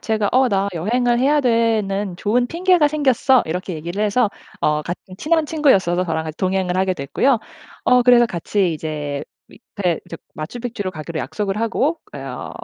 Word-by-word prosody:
제가 215 -2 0
"어 255 0 +4
나 200 0 +1
여행을 235 +8 +1
해야 290 +3 +3
되는 215 -6 +1
좋은 235 +6 +1
핑계가 350 0 +3
생겼어." 265 -3 +3
이렇게 180 +2 -3
얘기를 170 +6 -4
해서 210 +1 +2 0.3
어 150 0 +1
같은 180 +3 -7
친한 320 0 +1
친구였어서 190 - +2
저랑 160 -2 -2
같이 155 0 -6
동행을 185 -1 0
하게 190 0 +1
됐고요. 180 - +1 0.5
어 250 0 +5
그래서 240 -1 +6
같이 185 0 -1
이제 150 -2 -4 0.2
밑에 185 -7 -3
저 - - -6 0.2
마추픽추로 215 +4 -5
가기로 155 +1 -6
약속을 205 -1 -3
하고 275 +8 0 0.2
어 - - -6
205 Hz, 350 characters per minute, -20 LUFS, 175-250 Hz, 0.5 s, 그래서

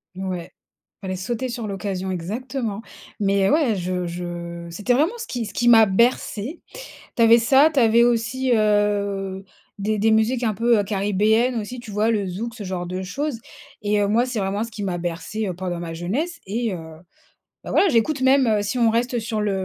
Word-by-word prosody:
Ouais, 185 -2 -5 0.5
fallait 185 -1 -4
sauter 240 +6 -3
sur 235 -3 -4
l'occasion, 195 -1 -4
exactement. 220 +4 -4 0.4
Mais 195 -1 +2
ouais, 290 -8 +3
je 180 -1 -2
je 170 0 -6
c'était 205 +8 0
vraiment 325 - +1
ce 465 - -6
qui 240 -3 -3
ce 205 - -8
qui 240 - 0
m'a 225 -2 +8
bercée. 235 - 0 0.5
Tu 230 - +3
avais 230 +1 +7
ça, 270 +6 +5
tu 275 - +3
avais 230 0 +5
aussi, 240 +2 +1
heu, 200 -2 0 0.3
des 215 +2 0
des 220 +2 +3
musiques 225 +3 +2
un 220 -2 +1
peu, 230 +1 +3
heu, - - +1
caribéennes 210 +4 +1
aussi, 230 +3 -4
tu 230 -4 -10
vois? 215 +3 +1
Le 205 -4 0
zouk, 225 +6 -5
ce 215 - -7
genre 180 -1 -3
de 185 +2 -4
choses. 275 +6 -3 0.4
Et 205 0 +1
heu, 200 - +2
moi, 235 +3 +3
c'est 250 -3 -3
vraiment 200 +3 -1
ce 230 - -11
qui 210 -1 -6
m'a 180 -2 -2
bercée, 175 +5 -4
heu, 185 - -2
pendant 175 -1 -4
ma 165 -1 -5
jeunesse. 255 - -3
Et 220 +1 -2
heu, - - -4 0.9
bah, - - -8
voilà, 390 - +4
j'écoute 260 +4 +1
même 265 0 +4
heu, 210 -1 +2
si 205 +5 -2
on 230 -2 +4
reste 240 +2 0
sur 220 -1 -2
le, 195 -2 -1
215 Hz, 200 wpm, -22 LUFS, 190-240 Hz, 0.9 s, m'a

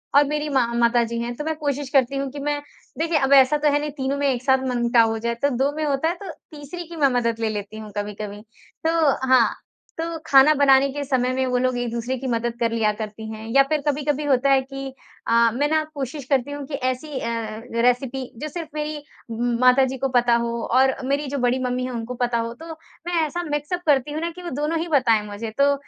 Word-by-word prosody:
और 285 - +8
मेरी 300 +1 -2
मा 265 -3 +2
माताजी 235 0 +2
हैं, 240 +1 -3
तो 295 - -5
मैं 315 0 -2
कोशिश 285 -2 -2
करती 270 -1 +2
हूँ 275 0 -2
कि 285 - -7
मैं 290 0 -2 0.4
देखिए 325 -1 +1
अब 275 0 +2
ऐसा 270 +2 +6
तो 295 0 +1
है 290 - +3
नहीं, 300 0 -3
तीनों 275 -1 -2
में 285 - +1
एक 255 -2 -1
साथ 265 0 +4
मन-मुटाव 235 -2 +3
हो 225 - -2
जाए, 235 +1 -2
तो 285 +4 +1
2 275 +3 +1
में 310 - -2
होता 280 +2 0
है, 345 - -2
तो 390 +2 -9 0.2
तीसरी 305 +3 -8
की 340 - -9
मैं 290 -3 +3
मदद 230 -1 -1
ले 225 -1 0
लेती 210 0 -5
हूँ 215 -1 -9
कभी-कभी। 205 0 -5 0.5
तो 325 - +3 0.4
हाँ, 255 -3 +6 0.5
तो 330 0 -3
खाना 275 +2 +6
बनाने 275 -1 +5
के 290 +1 -4
समय 255 -2 0
में 260 0 0
वो 250 0 +1
लोग 255 0 0
एक-दूसरे 240 +1 -2
की 260 +1 -5
मदद 235 0 -1
कर 230 -1 +1
लिया 225 -2 +2
करती 220 +1 -6
हैं 220 0 -8
या 275 - +8
फिर 305 -2 +1
कभी-कभी 295 0 0
होता 275 -1 +2
है 270 -1 +5
कि 270 0 -7 0.3
अ, 230 0 +4
मैं 285 +4 +1
ना 315 0 +2
कोशिश 280 +1 -4
करती 275 -1 +1
हूँ 285 -1 -5
कि 295 - -9
ऐसी 260 +2 -3
अ, 225 -2 -4 0.2
रेसिपी 250 +1 0
जो 305 - -3
सिर्फ़ 325 +1 -6
मेरी 300 -1 -4 0.3
म 235 +1 -1
माताजी 260 +1 +4
को 270 - 0
पता 240 -1 +4
हो 235 0 -1 0.2
और 265 0 +4
मेरी 280 +1 0
जो 280 - -3
बड़ी 250 0 +1
मम्मी 250 0 -1
है 255 - -4
उनको 235 +1 -5
पता 240 -1 +1
हो, 230 0 -2
तो 320 +7 -12 0.4
मैं 345 -2 +1
ऐसा 345 +3 -4
मिक्स 295 +3 -2
अप 355 - -1
करती 285 -1 +3
हूँ 310 - -3
ना 335 - -1
कि 360 +2 -11
वो 345 - -4
दोनों 320 +2 0
ही 335 - -3
बताएँ 250 -8 +3
मुझे, 210 +2 -6
तो 280 +5 +3
265 Hz, 240 wpm, -23 LUFS, 235-290 Hz, 0.5 s, और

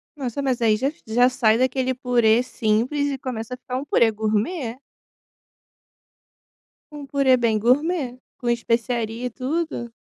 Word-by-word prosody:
Nossa, 270 -1 -4
mas 255 -3 -1
aí 220 -2 +4
já 270 +6 -1 0.2
já 245 +3 +4
sai 225 -3 +3
daquele 260 0 +1
purê 245 -2 +2
simples 250 +5 0
e 275 -1 -2
começa 250 -2 -5
a - - -5
ficar 255 0 -5
um 275 - -4
purê 230 -5 +3
gourmet. 220 - -2 2.1
Um 295 -2 -9
purê 275 -1 +3
bem 225 -3 +1
gourmet, 260 - +1 0.2
com 240 - -3
especiaria 235 0 -1
e - - -1
tudo. 260 -1 -3
250 Hz, 145 wpm, -23 LUFS, 230-270 Hz, 2.1 s, aí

